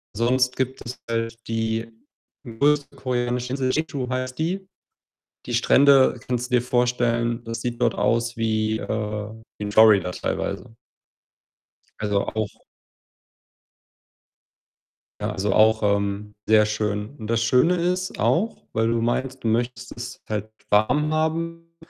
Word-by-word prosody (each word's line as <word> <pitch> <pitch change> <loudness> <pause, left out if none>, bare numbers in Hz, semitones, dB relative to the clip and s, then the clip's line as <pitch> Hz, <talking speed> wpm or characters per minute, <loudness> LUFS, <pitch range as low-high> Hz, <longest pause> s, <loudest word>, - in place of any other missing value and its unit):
sonst 125 +3 +2
gibt 130 0 -2
es 120 - -6
halt 115 0 -1
die 115 0 -1 0.6
größte 140 +5 +1
koreanische 125 -1 -2
Insel, 130 -1 0
Jeju 145 -4 -2
heißt 130 0 -3
die. 185 +5 -2 0.8
Die - - -3
Strände 135 -3 +5
kannst 125 0 -2
du 125 - +4
dir 120 - +2
vorstellen, 120 -1 +1
das 115 -1 -5
sieht 120 -1 -3
dort 120 -2 +2
aus 115 +1 0
wie, 110 -1 0
äh, 105 -1 -3 0.3
in 105 0 -4
Florida 105 -4 +6
teilweise. 110 - -4 1.3
Also, 105 -2 0
auch 110 -1 0 2.7
ja, - - -1
also, 100 +1 -1
auch, 110 +1 +4
ähm, 100 0 0
sehr 105 -1 +5
schön 105 0 -2
und 110 -5 -8
das 115 0 +1
Schöne 125 +10 +4
ist 180 +2 -1
auch, 215 +7 0
weil 115 +1 +1
du 115 0 +1
meinst, 130 +3 -2
du 115 - +1
möchtest 120 +1 -1
es 120 +1 -7
halt 105 0 -3 0.2
warm 145 +9 +3
haben, 165 +1 -2
120 Hz, 130 wpm, -23 LUFS, 110-130 Hz, 2.7 s, Florida